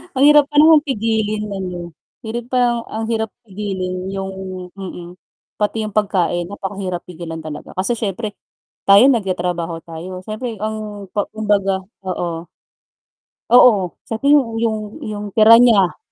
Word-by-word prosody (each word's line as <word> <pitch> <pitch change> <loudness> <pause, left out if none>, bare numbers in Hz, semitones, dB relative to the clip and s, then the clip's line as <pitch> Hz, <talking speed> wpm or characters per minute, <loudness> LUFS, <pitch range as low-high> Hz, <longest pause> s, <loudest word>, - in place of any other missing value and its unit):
Ang 265 - +3
hirap 295 -1 +7
pa 295 - -12
namang 310 -1 +7
pigilin 220 -4 -1
no'n, 195 -2 -4
'no? 175 -1 -6 0.4
Hirap 235 +2 -4
pa 255 - +1
'yong 240 -1 +2
ang 220 +1 -4
hirap 220 -1 -1
pigilin 190 -3 -4 0.2
'yong 195 0 -4 0.5
mm, 180 -3 -7 0.5
pati 215 +1 0
'yong 215 - -4
pagkain 180 -4 +1
napakahirap 195 -2 -5
pigilan 165 -2 -7
talaga. 155 -1 -8
Kasi 195 +6 0
siyempre, 210 0 -3 0.6
tayo 200 +4 +8
nagtatrabaho 180 -7 -1
tayo, 175 +3 -7
siyempre 225 +2 -5
ang 215 -2 -5
pa 205 - 0
kumbaga, 200 -3 +1 0.2
oo. 170 -2 -3 1.0
Oo, 220 -7 +5
sa 225 - -4
ting 280 +1 +4
'yong 230 -5 -1
'yong 220 -2 0 0.3
'yong 210 -1 -5
tira 225 +1 +8
niya. 210 -7 +4
205 Hz, 145 wpm, -19 LUFS, 185-225 Hz, 1.0 s, tayo